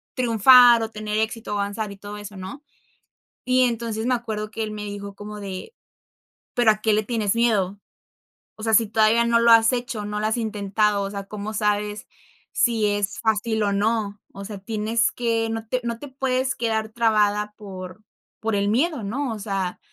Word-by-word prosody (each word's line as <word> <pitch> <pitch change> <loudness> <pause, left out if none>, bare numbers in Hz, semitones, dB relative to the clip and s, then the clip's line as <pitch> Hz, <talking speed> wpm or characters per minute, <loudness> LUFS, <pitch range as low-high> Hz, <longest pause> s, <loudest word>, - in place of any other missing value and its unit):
triunfar, 240 0 +7
o 220 - -3
tener 215 0 -3
éxito, 220 +1 -2
avanzar 205 +1 -2
y 200 - -10
todo 205 +1 -8
eso, 205 0 -9
¿no? 190 +10 -8 0.8
Y, 255 0 +3
entonces, 230 -2 -2
me 255 - +2
acuerdo 215 -3 -4
que 225 - -3
él 215 - -5
me 210 -1 -6
dijo 200 -1 -7
como 210 +1 -8
de: 195 - -7 0.8
"¿Pero 240 -2 +4
a 215 0 0
qué 220 -1 +2
le 215 - +2
tienes 215 -2 -1
miedo? 205 -4 +1 0.8
O - - -13
sea, 225 0 0
si 230 - +5
todavía 220 +2 +3
no 235 0 +3
lo 235 0 +5
has 225 +1 +6
hecho, 240 -4 -3
no 210 0 -3
lo 215 - -1
has 220 - 0
intentado, 210 -2 0
o 195 - -3
sea, 200 -1 -6
cómo 210 +1 -6
sabes 210 -1 -1 0.4
si 230 -3 +2
es 205 -1 -1
fácil 220 0 0
o 205 - +1
no. 205 0 0
O 200 - -8
sea, 210 0 -7
tienes 220 +3 0
que 230 -2 -1
no 225 0 -4
te 255 +2 0
no 235 -1 -3
te 290 - -8
puedes 260 0 -1
quedar 220 -2 -1
trabada 210 -2 +1
por 185 -1 -9 0.4
por 220 -1 -1
el 200 0 +1
miedo, 275 +4 +1
¿no?" 250 +4 -2
O 215 - -7
sea, 195 -3 -3
215 Hz, 195 wpm, -23 LUFS, 205-230 Hz, 0.8 s, triunfar